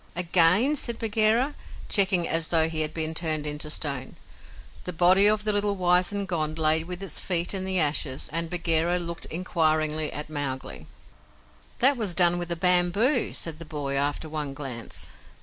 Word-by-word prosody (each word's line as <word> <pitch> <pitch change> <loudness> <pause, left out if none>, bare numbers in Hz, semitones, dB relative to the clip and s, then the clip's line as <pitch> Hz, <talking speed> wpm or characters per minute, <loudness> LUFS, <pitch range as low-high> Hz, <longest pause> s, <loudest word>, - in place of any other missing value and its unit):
"Again!" 180 - +2
said 235 -5 0
Bagheera, 225 +5 +1 0.3
checking 190 -4 +3
as 165 0 -1
though 160 -2 +3
he 160 -1 -2
had 155 0 -1
been 160 0 -3
turned 160 -2 -1
into 150 +1 -5
stone. 140 -4 -3 0.7
The 180 - -5
body 185 +4 +6
of 215 0 +2
a - - +4
little 205 0 +1
wizened 180 +2 0
Gond 155 -3 -2
lay 160 0 +2
with 180 +2 -8
its 195 - -1
feet 175 0 +1
in 190 -1 -4
the 190 -1 +2
ashes, 145 -3 0
and 165 0 -2
Bagheera 170 0 0
looked 170 -1 -4
inquiringly 155 -3 -1
at 150 - -7
Mowgli. 145 -3 -5 0.9
"That 265 +2 +3
was 205 -7 -2
done 175 -1 +3
with 175 0 -6
a - - 0
bamboo," 180 - +1
said 165 -2 -5
the - - -7
boy, 145 -3 -5
after 145 +3 -1
one 150 -3 -5
glance. 130 -5 -7
170 Hz, 170 wpm, -25 LUFS, 155-190 Hz, 0.9 s, body